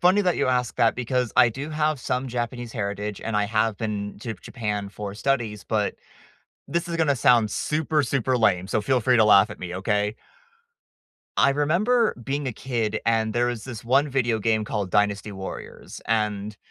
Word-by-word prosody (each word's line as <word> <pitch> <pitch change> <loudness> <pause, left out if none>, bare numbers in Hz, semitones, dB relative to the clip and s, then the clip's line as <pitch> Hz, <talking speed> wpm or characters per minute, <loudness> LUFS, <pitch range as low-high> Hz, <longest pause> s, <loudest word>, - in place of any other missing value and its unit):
funny 185 +3 +5
that 180 -2 +1
you - - +1
ask 125 -1 0
that 115 - +3
because 125 0 -1
I 125 -2 +7
do 140 +7 -6
have 155 -2 0
some 125 +2 -2
Japanese 120 0 -4
heritage, 105 -1 -3
and 115 - -2
I 105 - +2
have 110 0 0
been 105 -2 -4
to 115 - -7
b - - -3
y - - -21
Japan 105 -3 -3
for 100 0 -7
studies, 115 -5 -1
but - - 0 0.7
this 170 0 -1
is 170 - -3
gonna 145 -4 +2
sound 115 -2 +4
super, 150 -1 0
super 130 0 0
lame, 95 -4 +2
so 110 - 0
feel 130 +2 +2
free 125 +1 +3
to 110 - +5
laugh 100 0 +6
at 105 - -9
me, 90 -1 -5
okay? 105 +2 0 1.2
I 140 - +5
remember 185 - +2
being 140 +3 -2
a 125 - -2
kid, 110 -3 -2
and 110 -1 +2
there 120 0 +1
was 120 -3 -3
this 120 -4 -8
one 135 +5 +3
video 120 -4 +1
game 110 0 +1
called 105 -3 -3
Dynasty 105 0 +1
Warriors, 95 0 -8
and 105 -2 -1
115 Hz, 195 wpm, -24 LUFS, 105-135 Hz, 1.2 s, I